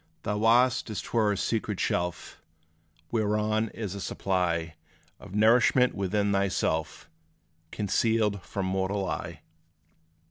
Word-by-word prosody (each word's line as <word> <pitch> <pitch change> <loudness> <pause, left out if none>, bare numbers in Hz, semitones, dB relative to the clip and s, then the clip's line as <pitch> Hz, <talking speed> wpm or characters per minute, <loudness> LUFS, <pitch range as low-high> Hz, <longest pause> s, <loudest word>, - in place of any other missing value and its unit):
Thou 105 0 -2
hast, 120 +3 +3
as 110 - -3
't - - -8
were, 110 -3 +3
a 100 - -1
secret 110 -2 -2
shelf 90 -1 -2 0.7
Whereon 110 0 0
is 105 -4 -5
a 100 - -6
supply, 85 -4 -1 0.5
Of 95 - -10
nourishment 120 +3 +4
within 100 +1 0
thyself, 80 -5 -1 0.6
Concealed 105 +1 0
from 95 +2 -4
mortal 95 +1 -1
eye. - - -5
100 Hz, 115 wpm, -28 LUFS, 95-110 Hz, 0.7 s, nourishment